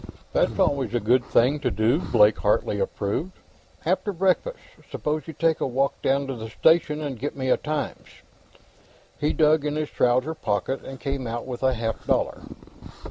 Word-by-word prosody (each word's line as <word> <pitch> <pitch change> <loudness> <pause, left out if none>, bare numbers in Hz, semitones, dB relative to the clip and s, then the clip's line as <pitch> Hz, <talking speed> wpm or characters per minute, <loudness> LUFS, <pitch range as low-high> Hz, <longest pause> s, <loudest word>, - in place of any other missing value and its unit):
"That's - - +1
always 130 -5 +1
a - - +3
good 120 +3 +3
thing 130 +5 +2
to - - 0
do," 115 +7 +2
Blake 105 - +3
Hartley 105 0 +1
approved. 100 - -2 0.5
"After 185 +4 0
breakfast, 195 - 0 0.3
suppose 155 +1 -3
you 160 - -6
take 165 +1 +1
a - - +1
walk 135 +2 -1
down 140 +1 +1
to 135 - -4
the 110 -1 -7
station 155 +4 +2
and 140 -6 -4
get 145 +3 -4
me 130 -1 -2
a - - +4
Times." 150 -1 -4 1.1
He 150 - +1
dug 155 -1 +3
in 150 0 -2
his 155 -1 -3
trouser 125 +5 +2
pocket 105 - -2
and 135 -1 -9
came 135 -2 -3
out 115 +1 -4
with 125 -2 -6
a 130 -1 +2
half 115 -1 -3
dollar. - - 0
135 Hz, 180 wpm, -24 LUFS, 120-155 Hz, 1.1 s, a